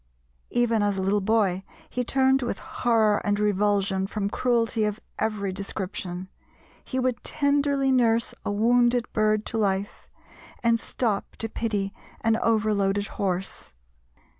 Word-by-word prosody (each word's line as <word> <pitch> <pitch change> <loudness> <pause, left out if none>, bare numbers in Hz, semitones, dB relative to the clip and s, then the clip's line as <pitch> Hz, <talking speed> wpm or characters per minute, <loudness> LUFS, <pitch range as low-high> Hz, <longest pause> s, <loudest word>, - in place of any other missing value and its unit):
Even 235 -2 +2
as 205 -1 +1
a - - -1
little 200 +2 +2
boy 195 -3 +1 0.2
he 250 - -2
turned 265 +2 +3
with 240 - -2
horror 220 -3 +1
and 205 0 0
revulsion 200 -2 +1
from 200 -1 -2
cruelty 230 -3 +1
of 210 +1 -1 0.2
every 210 -3 -1
description: 185 -2 -5 0.6
he 260 - -4
would 255 -1 0
tenderly 285 -2 +1
nurse 235 -2 +3
a - - -2
wounded 240 +3 +3
bird 215 0 +2
to 225 - -3
life, 200 -1 -1 0.5
and 230 0 +3
stop 220 -5 -2
to 225 - -4
pity 210 -3 -2 0.3
an 225 -1 +3
overloaded 210 -3 +1
horse. 185 - -3
215 Hz, 135 wpm, -26 LUFS, 200-240 Hz, 0.6 s, turned